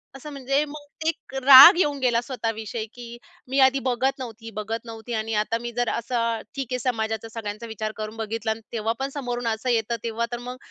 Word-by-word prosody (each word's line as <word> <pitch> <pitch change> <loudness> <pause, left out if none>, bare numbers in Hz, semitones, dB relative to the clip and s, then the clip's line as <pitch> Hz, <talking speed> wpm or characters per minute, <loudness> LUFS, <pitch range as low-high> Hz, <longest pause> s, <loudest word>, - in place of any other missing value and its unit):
असं 295 +3 -9
म्हणजे 275 +1 0
मग 295 +1 -8
एक 325 -4 -3
राग 275 +4 +11
येऊन 290 -5 +1
गेला 240 -3 +2
स्वतः 240 -2 -3
विषयी, 220 +1 -5
की 240 -1 -10 0.3
मी 270 +2 0
आधी 270 +1 +2
बघत 255 +2 0
नव्हती, 225 -2 -8
बघत 225 +2 -4
नव्हती 225 +1 -8
आणि 220 0 -2
आता 230 - -2
मी 240 0 -5
जर 245 -1 +1
असं 230 -1 -1
ठीक 270 -3 -3
आहे 250 - -1
समाजाचा 220 -2 -2
सगळ्यांचा 225 0 -6
विचार 215 -1 -4
करून 215 +1 -6
बघितला 220 0 -2
अन् 220 - -4
तेव्हा 225 0 -1
पण 270 +1 -2
समोरून 245 -3 -3
असं 225 +3 -1
येतं 235 -1 +1
तेव्हा 230 0 -1
तर 240 - -2
मग, 250 +1 -7
235 Hz, 205 wpm, -24 LUFS, 225-260 Hz, 0.3 s, राग